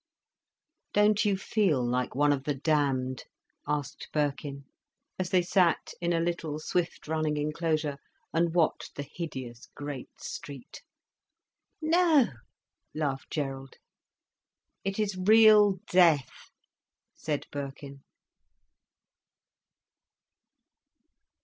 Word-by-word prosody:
"Don't 210 +1 +4
you 200 -2 +2
feel 190 - +1
like 125 +1 -1
one 145 +1 +4
of 135 -1 -4
the 145 - 0
damned?" 135 -3 0 0.4
asked 145 -1 -3
Birkin, 145 -2 -2 0.5
as 185 -1 -1
they 180 -1 +3
sat 175 -1 +2
in 175 0 0
a 170 - +2
little, 165 -3 -2
swiftly 165 0 -2
running 155 -1 0
enclosure, 150 -1 -1 0.3
and 165 +1 +1
watched 170 -3 +1
the 145 - -4
hideous 130 -7 -7
great 145 -3 -6
street. 140 -4 -8 1.0
"No," 320 -5 +4 0.7
laughed 140 -4 -2
Gerald. 135 -3 -4 1.1
"It 195 0 -2
is 210 -3 0
real 210 +1 +6 0.2
death," 165 -8 +3 0.6
said 150 -2 -3
Birkin. 140 0 -7
155 Hz, 95 wpm, -29 LUFS, 140-180 Hz, 1.1 s, real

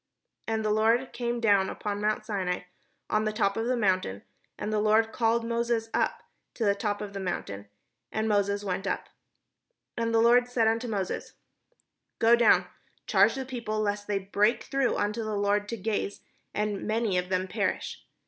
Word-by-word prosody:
And 220 -1 -1
the 215 - +2
Lord 225 +4 +2
came 240 0 -2
down 200 -4 +3
upon 205 -1 -4
mount 215 0 0
Sinai, 190 -4 -2 0.5
on 215 0 +1
the 215 - +1
top 200 -2 +1
of 225 +1 -1
the 250 0 +1
mount: 190 -4 +2
and 100 - -8
the 215 - +2
Lord 215 +1 +3
called 230 0 +1
Moses 235 -1 -1
up - - 0 0.3
to 230 - -1
the 200 - +4
top 205 0 -2
of 200 -1 -7
the 200 - -4
mount; 180 - -3 0.6
and 220 0 -1
Moses 200 -1 +1
went 195 0 -2
up. - - -2 0.9
And 230 -1 -1
the 225 - +3
Lord 240 +2 +5
said 240 -2 +2
unto 225 +2 +1
Moses: 200 -4 -3 0.4
" - - -41 0.3
Go 230 +1 +6
down, 235 0 +5 0.4
charge - - +4
the 265 -1 -4
people, 235 -4 -3
lest 205 -1 -1
they 205 -1 0
break 205 +3 +1
through 270 -2 0
unto 210 +2 -1
the 215 -1 -2
Lord 205 0 +1
to 230 - -3
gaze, 205 0 -2 0.3
and 210 -1 -2
many 215 -4 +1
of 180 0 -5
them 185 0 0
perish. 180 - -2
215 Hz, 185 wpm, -28 LUFS, 200-230 Hz, 0.9 s, Go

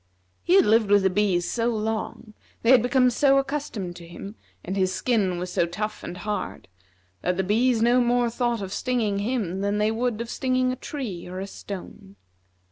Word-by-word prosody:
He 360 - +3
had 390 - +6
lived 220 -1 +3
with 205 -1 +5
the 190 - +3
bees 185 -3 +1
so 230 -1 0
long, 220 -1 -3 0.3
they 230 - +5
had 255 -3 +7
become 250 +1 +3
so 275 +3 +4
accustomed 270 -10 -3
to 170 -1 -11
him, 195 +4 -9 0.3
and 190 - -3
his 185 -1 +1
skin 195 -4 0
was 180 +1 -5
so 170 - +2
tough 210 +5 -4
and 180 - -6
hard, 205 - -4 0.5
that 180 0 0
the 190 - +1
bees 225 +4 +2
no 245 +2 +4
more 240 0 +2
thought 240 -2 -1
of 190 0 -5
stinging 225 -6 0
him 200 -5 -2
than 200 +1 0
they 210 +1 +2
would 230 0 -1
of 235 - -4
stinging 255 -1 +1
a - - -2
tree 245 - -6
or 185 +1 -6
a 195 - -3
stone. 195 0 -9
215 Hz, 200 wpm, -25 LUFS, 190-245 Hz, 0.5 s, had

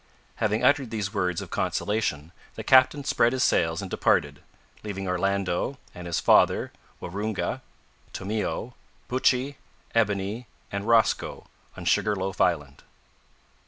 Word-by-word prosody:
Having 105 +3 0
uttered 140 -1 +3
these 105 -3 -3
words 90 -4 0
of - - -12
consolation, 85 -8 -1 0.2
the - - -6
captain 130 +2 +5
spread 120 -3 +2
his 130 - +1
sails 80 +2 +2
and 95 - -7
departed, 70 0 +1 0.4
leaving 95 -2 -5
Orlando, 95 +6 -1 0.2
and 90 0 -8
his 85 - 0
father, - - +4 0.3
Waroonga, 100 +4 -3 0.5
Tomeo, 110 +4 -3 0.3
Buttchee, 130 +2 +1 0.4
Ebony, 105 +1 0 0.2
and 100 +1 -4
Rosco 115 -1 +2 0.3
on - - -7
Sugar 105 -1 +2
loaf 95 0 -3
Island. 75 -6 0
100 Hz, 125 wpm, -26 LUFS, 90-115 Hz, 0.5 s, captain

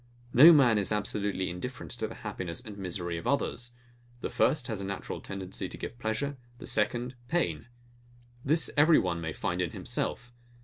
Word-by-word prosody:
No 155 +7 +10
man 125 -9 +6
is 100 0 -1
absolutely 105 -2 -1
indifferent 120 +8 -6
to 110 -2 -3
the 115 - -9
happiness 90 -5 -4
and 105 -2 -9
misery 90 -3 -3
of - - -6
others. 120 -3 -1 0.5
The - - -3
first 150 -5 +2
has 110 -4 -3
a - - -4
natural 100 0 -4
tendency 95 -1 -5
to - - -7
give 120 - -7
pleasure; 120 +5 -2 0.2
the - - -9
second, 120 +4 0
pain. 85 - 0 0.8
This 155 +4 +1
every 155 +2 +7
one 85 -2 0
may 80 -1 -3
find - - -2
in - - -2
himself. 120 +1 -2
110 Hz, 175 wpm, -30 LUFS, 95-125 Hz, 0.8 s, No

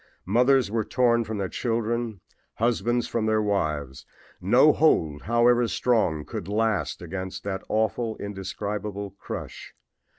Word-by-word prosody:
Mothers 125 +3 +3
were 110 -1 0
torn 120 0 +2
from 110 0 -4
their 100 -2 -1
children, 115 -1 -2 0.3
husbands 120 +1 0
from 110 -2 -1
their 110 0 +2
wives. 75 -10 -1 0.4
No - - +5
hold, 75 -2 +2
however 120 +2 +3
strong, 95 -13 +1
could - - -6
last 105 -4 -1
against 95 +2 -6
that 95 -1 -3
awful, 110 +1 0
indescribable 100 0 -5
crush. - - -7
110 Hz, 125 wpm, -25 LUFS, 95-115 Hz, 0.4 s, No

